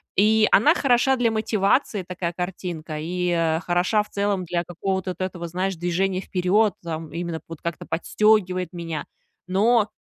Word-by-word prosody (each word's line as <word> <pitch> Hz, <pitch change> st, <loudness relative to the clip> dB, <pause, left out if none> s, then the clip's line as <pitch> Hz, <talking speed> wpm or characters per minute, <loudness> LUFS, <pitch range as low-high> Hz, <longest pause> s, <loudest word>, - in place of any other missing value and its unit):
И 215 Hz, +2 st, +4 dB
она 300 Hz, +10 st, +6 dB
хороша 265 Hz, 0 st, +3 dB
для 240 Hz, -1 st, +2 dB
мотивации, 215 Hz, -1 st, +1 dB
такая 180 Hz, -1 st, -3 dB
картинка, 175 Hz, -3 st, -5 dB
и, 180 Hz, +3 st, -2 dB
э, 165 Hz, -1 st, +1 dB
хороша 180 Hz, +4 st, +2 dB
в -, -, -19 dB
целом 200 Hz, -2 st, -1 dB
для 170 Hz, +1 st, -1 dB
какого-то 190 Hz, +2 st, -3 dB
вот -, -, -10 dB
этого, 180 Hz, -2 st, -3 dB
знаешь, 185 Hz, +2 st, -2 dB
движения 185 Hz, +3 st, -1 dB
вперед 195 Hz, +3 st, +2 dB
там, 160 Hz, -2 st, -5 dB
именно 170 Hz, 0 st, -4 dB
вот 165 Hz, -2 st, -8 dB
как-то 170 Hz, -2 st, -4 dB
подстегивает 185 Hz, +1 st, +1 dB
меня. 165 Hz, -3 st, -5 dB, 0.4 s
Но, 210 Hz, +3 st, +3 dB
185 Hz, 155 wpm, -24 LUFS, 170-205 Hz, 0.4 s, она